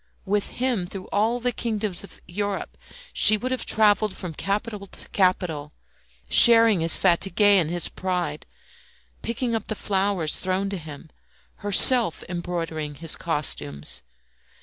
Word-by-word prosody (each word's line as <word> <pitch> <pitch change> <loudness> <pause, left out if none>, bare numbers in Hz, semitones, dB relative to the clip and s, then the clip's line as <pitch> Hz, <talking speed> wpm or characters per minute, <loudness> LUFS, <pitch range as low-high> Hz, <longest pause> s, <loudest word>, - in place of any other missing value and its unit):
With 205 +1 -1
him, 240 -8 -1
through 190 0 -9
all 225 +4 0
the 245 +1 -1
kingdoms 215 -5 -4
of 200 - -14
Europe 200 +2 -5 0.4
she 215 +1 +6
would 255 +4 -5
have 255 -2 -3
travelled 210 -2 +2
from 180 -3 -7
capital 200 +3 -4
to - - -12
capital, 175 -6 -1 0.5
sharing 230 -4 +6
his 165 0 +4
fatigues 185 +4 +1
and 200 -6 +4
his 175 0 0
pride, 180 -5 -4 0.7
picking 235 +1 -3
up 225 -2 -4
the 215 - -3
flowers 195 -6 -1
thrown 190 +1 +1
to 195 - -4
him, 155 -1 -11 0.5
herself 205 0 +4
embroidering 165 -4 -5
his 165 +2 -1
costumes. 75 - -3
195 Hz, 135 wpm, -23 LUFS, 170-215 Hz, 0.7 s, she